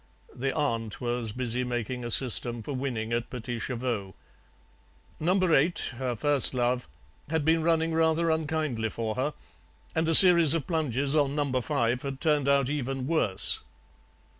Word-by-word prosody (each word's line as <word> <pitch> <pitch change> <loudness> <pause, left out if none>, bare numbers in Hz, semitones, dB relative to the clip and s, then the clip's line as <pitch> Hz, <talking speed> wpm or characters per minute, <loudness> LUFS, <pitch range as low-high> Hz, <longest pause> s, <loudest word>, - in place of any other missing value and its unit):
The 135 +2 -3
aunt 115 -8 -3
was 120 -2 -4
busy 125 +1 -3
making 125 0 -5
a 120 - -5
system 120 -1 +2
for 140 - -6
winning 120 -4 -4
at 120 0 -3
PETITS 120 -1 -6
CHEVAUX. 115 -7 -5 1.0
Number 180 +1 0
eight, 150 -1 0
her 125 -2 -3
first 140 +2 +3
love, 125 0 -2 0.4
had 160 -2 -2
been 165 +1 +2
running 165 0 0
rather 160 0 0
unkindly 155 -8 -3
for 110 0 -5
her, 135 +6 -4 0.6
and 160 0 -1
a 165 - +6
series 170 -4 +10
of 155 -5 -3
plunges 145 -3 -1
on 145 -2 0
number 140 -4 -2
five 120 +2 -2
had 135 -1 -7
turned 150 -3 0
out 140 -2 +1
even 135 -2 -4
worse. 135 - +2
135 Hz, 155 wpm, -26 LUFS, 120-155 Hz, 1.0 s, series